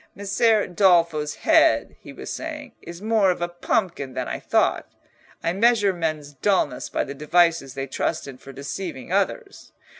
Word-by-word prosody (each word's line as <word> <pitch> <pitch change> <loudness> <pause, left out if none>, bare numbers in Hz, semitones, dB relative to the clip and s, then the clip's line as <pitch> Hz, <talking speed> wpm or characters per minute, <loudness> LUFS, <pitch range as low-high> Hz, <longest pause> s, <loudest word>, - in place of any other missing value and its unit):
"Messer 205 +2 +2
Dolfo's 170 -5 +2
head," 320 -1 +3
he - - -12
was - - -7
saying, 300 -4 -6
"is 170 +3 -10
more 215 -3 +3
of 180 - 0
a 175 - -1
pumpkin 175 -5 -2
than - - -3
I - - -4
thought. - - +1 0.6
I 165 +1 0
measure 210 -1 +3
men's 155 -4 -3
dulness 145 -5 0
by - - -1
the 140 - -6
devices 155 -2 +2
they 135 0 -3
trust 135 - -2
in 130 -2 -10
for 135 - -11
deceiving 140 +2 -6
others. 395 - -2
175 Hz, 160 wpm, -23 LUFS, 150-205 Hz, 0.6 s, head